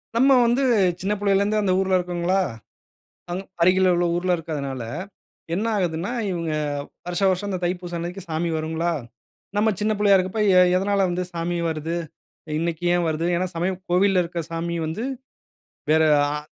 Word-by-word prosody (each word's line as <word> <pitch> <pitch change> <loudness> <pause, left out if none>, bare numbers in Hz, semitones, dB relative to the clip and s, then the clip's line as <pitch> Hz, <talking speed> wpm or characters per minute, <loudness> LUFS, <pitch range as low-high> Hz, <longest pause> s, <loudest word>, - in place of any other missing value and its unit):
நம்ம 265 +4 +5
வந்து 240 +4 +2 0.4
சின்ன 195 +3 0
புள்ளையில 200 -1 +2
இருந்தே 215 +1 +1
அந்த 190 -2 +2
ஊருல 190 -1 +2
இருக்கோங்களா. 180 +1 0 0.9
அங் 185 +2 -3 0.2
அருகில 185 +1 +5
உள்ள 175 0 +1
ஊருல 180 +1 +1
இருக்கறதனால 140 -6 -4 0.7
என்ன 205 +5 -1
ஆகுதுன்னா 175 +1 -1 0.2
இவங்க 165 -3 -2 0.5
வருஷா 180 +2 0
வருஷம் 190 +2 -1
இந்த 185 -2 -2
தைப்பூசம் 175 -1 -2
அன்னைக்கு 175 +3 -5
சாமி 160 +2 -1
வருங்களா? 160 +2 -1 0.6
நம்ம 215 +1 +3
சின்ன 215 +1 +2
புள்ளையா 205 -1 +5
இருக்கப்போ, 190 +4 -1 0.2
எ - - +9 0.2
எதனால 195 +1 +1
வந்து 180 +1 -1
சாமி 170 +1 -2
வருது. 160 +1 -3 0.6
இன்னைக்கு 170 0 -2
ஏன் 175 -1 +1
வருது. 160 +1 -1
ஏனா 185 +2 0
சமயம் 180 +2 -1
கோவில்ல 185 +1 +4
இருக்க 170 0 -4
சாமி 170 +1 -2
வந்து 175 +10 -3 0.9
வேற, 160 0 +5 0.3
ஆ - - -2
180 Hz, 155 wpm, -23 LUFS, 170-195 Hz, 0.9 s, எ